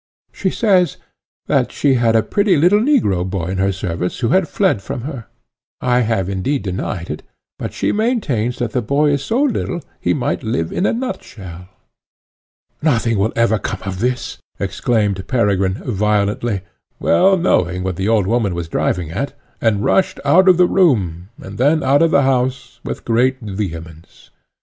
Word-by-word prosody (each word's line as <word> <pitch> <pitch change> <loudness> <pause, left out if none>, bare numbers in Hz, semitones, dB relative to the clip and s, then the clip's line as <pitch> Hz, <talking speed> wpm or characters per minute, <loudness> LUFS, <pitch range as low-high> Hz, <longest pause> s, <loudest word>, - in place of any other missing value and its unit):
She 190 - -1
says, 185 -4 +2 0.5
that - - +1
she 140 -2 +2
had 120 -3 +2
a 110 - +4
pretty 200 -4 +2
little 180 +7 +4
negro 220 - +2
boy 90 -2 -3
in 95 - -3
her 95 +1 +2
service 90 -2 -3
who 115 - +1
had 190 +2 +3
fled 190 - +1
from 120 - -5
her; 130 -3 -7 0.5
I 125 -1 +2
have, 110 -6 0
indeed, 100 +9 -1
denied 90 -2 -4
it, 75 - -5 0.4
but - - -4
she - - -1
maintains 190 - 0
that 120 -3 -2
the 125 - 0
boy 145 +6 +2
is 140 -1 0
so 240 - +1
little 235 -9 -1 0.2
he - - 0
might 125 - -1
live 95 -9 -2
in 195 - 0
a - - +2
nutshell. 95 - -6 1.1
"Nothing 115 -8 +1
will 110 +3 +1
ever 115 -2 +2
come 105 - -5
of 95 -2 -5
this," 125 +2 -2 0.2
exclaimed 105 -5 -1
Peregrine 100 -6 +1
violently, 105 -1 -1 0.4
well 190 - +4
knowing 90 - +1
what 95 -1 -2
the 95 +3 -2
old 110 -3 +3
woman 105 -3 0
was 85 -1 -4
driving 85 -2 -1
at, 135 +11 -3 0.3
and 105 -3 +1
rushed 190 - +2
out 185 +7 +5
of 180 - +6
the 180 - +6
room, 100 - +1
and 100 +2 -9
then 150 +5 +3
out 140 +2 +3
of 165 - +4
the 140 -3 +3
house, 125 -2 -1
with - - -6
great 125 +3 +2
vehemence. 85 - -7
115 Hz, 175 wpm, -18 LUFS, 95-145 Hz, 1.1 s, of